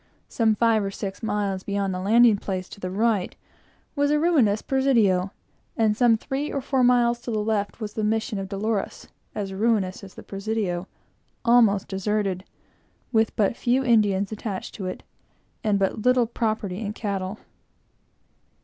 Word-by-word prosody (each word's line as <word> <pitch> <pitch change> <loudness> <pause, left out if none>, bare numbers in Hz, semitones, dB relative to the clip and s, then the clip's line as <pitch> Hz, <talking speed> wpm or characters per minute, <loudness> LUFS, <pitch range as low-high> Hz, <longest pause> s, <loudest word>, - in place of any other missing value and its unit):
Some 225 -2 +2
five 225 -1 +3
or 195 - -2
six 195 0 -6
miles 205 -3 -1
beyond 200 -1 -2
the 185 - -3
landing 220 +3 +5
place, 185 -2 -4
to - - -11
the 185 - -4
right, 205 0 0 0.6
was 285 -1 +2
a 300 0 +3
ruinous 270 -11 +3
Presidio, 225 -9 +2 0.5
and 220 -2 +3
some 235 -1 +4
three 275 +5 -3
or 280 - -1
four 265 -1 0
miles 240 -1 +3
to 240 - -8
the 220 - -1
left 210 -1 -1
was 210 -2 -5
the 220 - -3
Mission 220 -1 -1
of 195 0 -5
Dolores, 205 +1 -3 0.3
as 195 -2 -4
ruinous 200 -2 0
as 195 - -12
the - - -10
Presidio, 195 -3 -3 0.6
almost 230 -5 +4
deserted, 195 -1 -1 0.7
with 220 -2 +2
but 210 +1 +1
few 250 +3 +1
Indians 205 -5 +2
attached 210 -3 -5
to 190 -3 -5
it, 185 - -6 0.6
and 210 -2 +2
but 195 +2 -1
little 250 +1 +3
property 215 -4 -2
in 210 -2 -4
cattle. 200 -2 -3
215 Hz, 160 wpm, -24 LUFS, 195-235 Hz, 0.7 s, landing